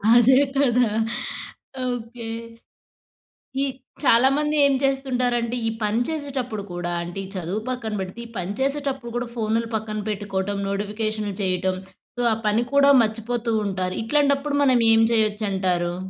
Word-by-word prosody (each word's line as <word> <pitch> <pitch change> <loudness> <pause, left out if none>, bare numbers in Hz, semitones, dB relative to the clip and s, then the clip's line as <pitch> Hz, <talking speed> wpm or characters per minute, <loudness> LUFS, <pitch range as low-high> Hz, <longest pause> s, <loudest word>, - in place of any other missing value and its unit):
అదే 255 +3 +6 0.2
కదా! 250 -3 +3 1.0
ఓకే. 235 -1 -5 1.4
ఈ - - +3 0.4
చాలా 245 +2 +6
మంది 300 0 0
ఏం 275 - +3
చేస్తుంటారంటే 250 -3 0
ఈ - - +1
పని 210 +3 +1
చేసేటప్పుడు 265 -8 -3
కూడా 175 0 -3
అంటే 175 +3 -7
ఈ - - -7
చదువు 185 +4 -2
పక్కన 225 -4 -3
పెడితే, 190 +4 -6
ఈ - - -14
పని 185 +2 -3
చేసేటప్పుడు 275 -3 -1
కూడా 240 0 -2
ఫోన్‌లు 225 +1 0
పక్కన 215 -1 -3
పెట్టుకోవడం, 200 -1 -2
నోటిఫికేషన్‌లు 210 0 -2
చేయటం. 185 0 0 0.4
సో, - - +1
ఆ - - +3
పని 215 +3 +3
కూడా 280 0 +6
మర్చిపోతూంటారు. 220 -4 -1
ఇట్లాంటప్పుడు 285 +2 +2
మనం 255 -3 +4 0.2
ఏం 225 - +5
చేయొచ్చంటారు? 195 -5 +1
225 Hz, 130 wpm, -23 LUFS, 205-255 Hz, 1.4 s, అదే